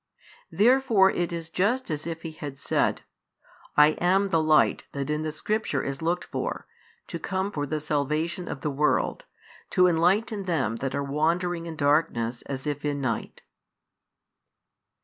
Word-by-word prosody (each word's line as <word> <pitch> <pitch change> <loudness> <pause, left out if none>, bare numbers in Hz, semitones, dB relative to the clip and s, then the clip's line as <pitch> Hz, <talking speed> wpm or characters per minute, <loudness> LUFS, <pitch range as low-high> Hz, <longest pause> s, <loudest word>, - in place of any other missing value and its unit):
Therefore 230 -4 +4
it 175 -1 -1
is 165 -1 -5
just 210 +5 0
as 155 +1 -3
if 165 -1 -5
He 165 - -5
had 145 -3 -7
said: - - 0 0.7
"I 150 0 +8 0.2
am 195 +2 +3
the 165 -3 +2
Light 155 -1 +3
that 140 +1 -3
in 150 0 -1
the 155 0 -2
Scripture 215 +8 -1
is 135 +1 -4
looked 170 +2 0
for, - - -4 0.4
to - - -6
come 190 +1 -2
for 145 -5 -3
the 155 +2 -2
salvation 155 +4 -1
of 135 - -5
the 150 - -1
world, 150 - 0 0.4
to 180 -2 +4
enlighten 190 +5 +2
them 135 - 0
that 135 +2 -3
are 140 - -1
wandering 165 +4 0
in 165 - -6
darkness 145 -6 +1
as 135 0 -5
if 145 -1 -3
in 145 -1 -1
night." 120 -5 -3
160 Hz, 160 wpm, -26 LUFS, 145-180 Hz, 0.7 s, I